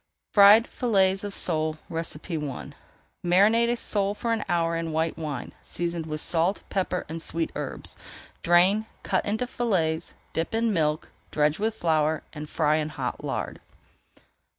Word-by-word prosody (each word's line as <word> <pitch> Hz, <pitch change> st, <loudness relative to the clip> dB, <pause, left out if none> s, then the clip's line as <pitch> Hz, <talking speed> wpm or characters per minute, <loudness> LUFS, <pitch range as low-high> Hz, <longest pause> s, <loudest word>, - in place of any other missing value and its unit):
FRIED 205 Hz, +3 st, +8 dB
FILLETS 195 Hz, -7 st, +1 dB
OF 205 Hz, -1 st, -5 dB
SOLE 155 Hz, -2 st, +1 dB
I 160 Hz, -3 st, -4 dB, 0.5 s
Marinate 210 Hz, +7 st, +4 dB
a 240 Hz, -, +2 dB
sole 205 Hz, -3 st, 0 dB
for 230 Hz, +2 st, -1 dB
an 225 Hz, -, -1 dB
hour 170 Hz, -1 st, +1 dB
in 165 Hz, -1 st, -2 dB
white 160 Hz, +1 st, 0 dB
wine, 150 Hz, -5 st, -5 dB
seasoned 170 Hz, -1 st, -3 dB
with 155 Hz, 0 st, -3 dB
salt, 175 Hz, +4 st, +1 dB
pepper, 185 Hz, -2 st, -1 dB
and 165 Hz, +1 st, -6 dB
sweet 165 Hz, 0 st, -3 dB
herbs. -, -, -6 dB, 0.5 s
Drain, 185 Hz, +6 st, +4 dB, 0.2 s
cut -, -, 0 dB
into 220 Hz, +4 st, 0 dB
fillets, 175 Hz, -10 st, -1 dB, 0.2 s
dip 165 Hz, +6 st, -2 dB
in 225 Hz, -1 st, +1 dB
milk, 155 Hz, -3 st, 0 dB, 0.2 s
dredge 150 Hz, +2 st, +1 dB
with 220 Hz, +1 st, 0 dB
flour, 160 Hz, -4 st, +1 dB
and 150 Hz, -1 st, -7 dB
fry 155 Hz, -1 st, +2 dB
in 155 Hz, -1 st, -1 dB
hot -, -, -4 dB
lard. -, -, -3 dB
170 Hz, 150 wpm, -26 LUFS, 160-205 Hz, 0.5 s, FRIED